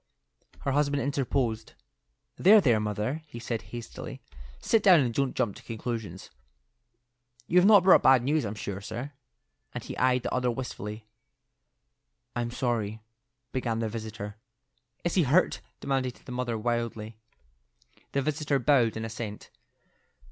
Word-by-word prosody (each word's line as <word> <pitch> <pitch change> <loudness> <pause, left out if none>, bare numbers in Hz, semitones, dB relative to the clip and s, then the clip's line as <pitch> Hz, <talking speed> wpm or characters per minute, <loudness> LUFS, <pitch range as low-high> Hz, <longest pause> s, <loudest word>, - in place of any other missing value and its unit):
Her 135 - -1
husband 145 0 +1
interposed. 130 -5 -1 0.6
"There, 215 +4 +7
there, 120 - +3
mother," 105 +8 -2
he 120 - -10
said, 115 -1 -3
hastily. 120 +3 -7 0.4
"Sit 225 - +2
down, 185 -5 +7
and 125 -4 +1
don't 135 +1 0
jump 105 -4 0
to - - -12
conclusions. 110 -5 -5 1.1
You've 180 +6 +4
not 205 -4 +7
brought 185 - +7
bad 130 -2 +6
news, 150 +3 +1
I'm 105 -1 -4
sure, 100 -2 -5
sir;" 120 +7 -6 0.6
and 120 - -4
he - - -7
eyed 125 -1 +3
the - - -3
other 125 -1 +1
wistfully. 110 -3 -5 1.3
"I'm 120 -1 -1
sorry—" 110 -3 -2 0.5
began 120 -3 -1
the 115 -1 -1
visitor. 110 -2 -6 0.7
"Is 175 - 0
he 185 - +4
hurt?" 160 +5 +3 0.2
demanded 130 -2 -1
the - - -8
mother, 125 -2 -2
wildly. 115 -1 -3 0.9
The 140 - +1
visitor 150 -1 0
bowed 125 -4 +3
in 110 - -3
assent. 110 -2 -7
120 Hz, 140 wpm, -28 LUFS, 110-140 Hz, 1.3 s, There